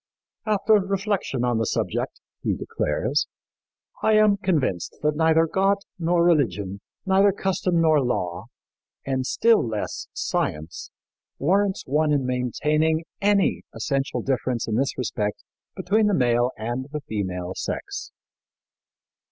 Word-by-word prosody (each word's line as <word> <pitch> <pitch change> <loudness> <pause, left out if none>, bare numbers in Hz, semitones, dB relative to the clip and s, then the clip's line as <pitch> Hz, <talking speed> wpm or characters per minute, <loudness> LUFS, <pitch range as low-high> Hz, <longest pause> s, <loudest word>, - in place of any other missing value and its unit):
"After 215 +1 +3
reflection 195 - -1
on 120 -2 +1
the 115 - +1
subject," - - -2 0.2
he - - 0
declares, - - -1 0.7
"I 220 - +3
am 215 -1 +5
convinced 155 - -1
that 150 0 +2
neither 160 +1 +4
God 195 +4 +2 0.2
nor 170 0 +2
religion, 100 - +1 0.2
neither 195 +1 +4
custom 185 -2 0
nor 155 -3 +4
law, 90 -6 -2 0.6
and 130 -1 -1
still 230 -1 +4
less 110 -3 -4
science, 75 +2 -3 0.5
warrants 195 +6 +1
one 150 +3 +1
in 140 -3 +1
maintaining 150 +6 +1 0.2
any 200 -1 +2
essential 135 -2 -1
difference 130 -2 -1
in 110 - -2
this 135 +4 0
respect 105 -4 -2 0.3
between 215 +2 +2
the 205 - +2
male 120 -2 +3
and 120 +4 -3
the 150 0 -4
female 95 -6 -4
sex." - - -5
150 Hz, 125 wpm, -24 LUFS, 120-190 Hz, 0.7 s, am